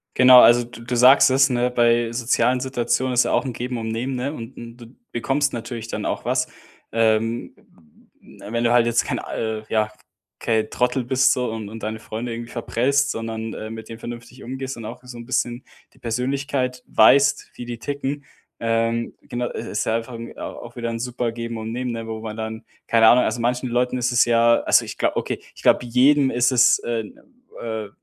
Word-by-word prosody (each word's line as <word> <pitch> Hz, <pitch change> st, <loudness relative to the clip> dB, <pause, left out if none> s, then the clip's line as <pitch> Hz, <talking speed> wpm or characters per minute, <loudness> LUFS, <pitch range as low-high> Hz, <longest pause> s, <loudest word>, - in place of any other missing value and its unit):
Genau, 130 Hz, -1 st, +9 dB
also 120 Hz, +2 st, +6 dB
d 120 Hz, 0 st, -12 dB
du 125 Hz, -, -2 dB
sagst 125 Hz, +4 st, +7 dB
es, 135 Hz, +2 st, +4 dB
ne? 125 Hz, 0 st, +1 dB
Bei 120 Hz, -1 st, +2 dB
sozialen 120 Hz, +1 st, +1 dB
Situationen 130 Hz, 0 st, -1 dB
ist 125 Hz, -, +4 dB
ja -, -, -1 dB
auch -, -, +1 dB
'n 130 Hz, -, -3 dB
Geben 125 Hz, +1 st, -4 dB
und 110 Hz, -1 st, -4 dB
Nehmen, 120 Hz, +4 st, -3 dB
ne, 130 Hz, +4 st, -3 dB
und 115 Hz, -2 st, -9 dB
und 115 Hz, 0 st, -10 dB
du 120 Hz, -2 st, -12 dB, 0.2 s
bekommst 135 Hz, +4 st, 0 dB
natürlich 115 Hz, -1 st, -6 dB
dann -, -, -4 dB
auch -, -, -3 dB
was, -, -, +1 dB, 0.4 s
ähm, 115 Hz, +1 st, +1 dB
w 75 Hz, -2 st, -23 dB
w -, -, -8 dB
wenn 115 Hz, 0 st, -1 dB
du 120 Hz, -, +3 dB
halt 120 Hz, -1 st, +5 dB
jetzt 120 Hz, -, +2 dB
kein -, -, -2 dB
äh, 110 Hz, -1 st, -4 dB
ja, 110 Hz, -1 st, +1 dB, 0.5 s
kein 110 Hz, -1 st, 0 dB
Trottel 125 Hz, +1 st, 0 dB
bist 130 Hz, +1 st, +3 dB
so 125 Hz, -2 st, -2 dB
und 110 Hz, -2 st, -6 dB
und 110 Hz, +1 st, -9 dB
deine 110 Hz, 0 st, -4 dB
Freunde 115 Hz, +2 st, -5 dB
irgendwie 115 Hz, 0 st, -7 dB
verprellst, 135 Hz, +4 st, 0 dB
sondern, 115 Hz, 0 st, -5 dB
äh, 110 Hz, -, -6 dB
mit 115 Hz, 0 st, -8 dB
denen 115 Hz, 0 st, -8 dB
vernünftig 120 Hz, +2 st, -9 dB
umgehst 130 Hz, +1 st, -5 dB
und 115 Hz, -, -8 dB
auch 120 Hz, +3 st, -8 dB
so 125 Hz, -1 st, -10 dB
'n 120 Hz, -, -9 dB
bisschen 120 Hz, 0 st, -2 dB, 0.3 s
die -, -, -24 dB
Persönlichkeit 125 Hz, +1 st, -2 dB
weißt, 135 Hz, +6 st, +4 dB
wie 120 Hz, -, -7 dB
die 120 Hz, -1 st, -6 dB
ticken. 140 Hz, +3 st, -4 dB, 0.4 s
Ähm, 115 Hz, 0 st, 0 dB
genau, 120 Hz, 0 st, -4 dB
i -, -, -5 dB
ist 105 Hz, -, -3 dB
ja 110 Hz, -, +1 dB
einfach 115 Hz, +2 st, -4 dB
au 115 Hz, 0 st, -9 dB
auch 120 Hz, 0 st, -8 dB
wieder 120 Hz, -1 st, -3 dB
'n 115 Hz, 0 st, -4 dB
super 120 Hz, -1 st, -2 dB
Geben 115 Hz, 0 st, -5 dB
und 110 Hz, 0 st, -5 dB
Nehmen, 125 Hz, +1 st, -3 dB
ne, 115 Hz, -1 st, -5 dB
wo 110 Hz, -1 st, -5 dB
man 110 Hz, -1 st, -6 dB
dann 110 Hz, 0 st, -6 dB, 0.2 s
keine 115 Hz, -1 st, +5 dB
Ahnung, 125 Hz, +2 st, +6 dB
also 110 Hz, +2 st, -2 dB
manchen 125 Hz, +2 st, -1 dB
Leuten 125 Hz, +1 st, 0 dB
ist 125 Hz, 0 st, 0 dB
es 120 Hz, +1 st, +4 dB
ja 115 Hz, 0 st, +4 dB
also, -, -, +3 dB
ich -, -, -8 dB
glau -, -, +1 dB
okay, -, -, -2 dB, 0.2 s
ich -, -, -13 dB
glaube 125 Hz, -, +3 dB
jedem 135 Hz, +3 st, +4 dB
ist 120 Hz, +1 st, +2 dB
es 120 Hz, -1 st, +5 dB
äh, 115 Hz, -1 st, -2 dB, 0.6 s
äh, 110 Hz, -2 st, -4 dB
120 Hz, 215 wpm, -22 LUFS, 115-125 Hz, 0.6 s, Genau